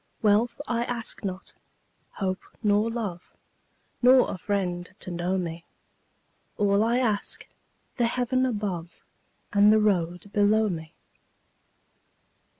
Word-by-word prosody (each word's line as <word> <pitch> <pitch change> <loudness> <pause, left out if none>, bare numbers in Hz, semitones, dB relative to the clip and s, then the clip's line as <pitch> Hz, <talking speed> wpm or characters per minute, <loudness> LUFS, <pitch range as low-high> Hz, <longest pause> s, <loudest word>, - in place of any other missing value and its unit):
Wealth 225 +4 +3
I 235 -1 0
ask 235 -3 -3
not, 190 -1 -5 0.6
hope 190 -2 -2 0.2
nor 210 +1 +3
love, 210 -7 -5 0.7
Nor 255 +1 +6
a - - -5
friend 180 -3 -2
to 185 - -6
know 175 +2 -1
me; 170 -2 -4 0.9
All 205 0 +3
I 235 +2 +2
ask, 220 -5 0 0.5
the 240 -2 +3
heaven 250 +2 0
above 195 -7 -4 0.5
And 205 +1 +6
the 220 - +6
road 180 -3 0
below 210 +1 +3
me. 160 -3 -6
205 Hz, 115 wpm, -26 LUFS, 185-230 Hz, 0.9 s, Nor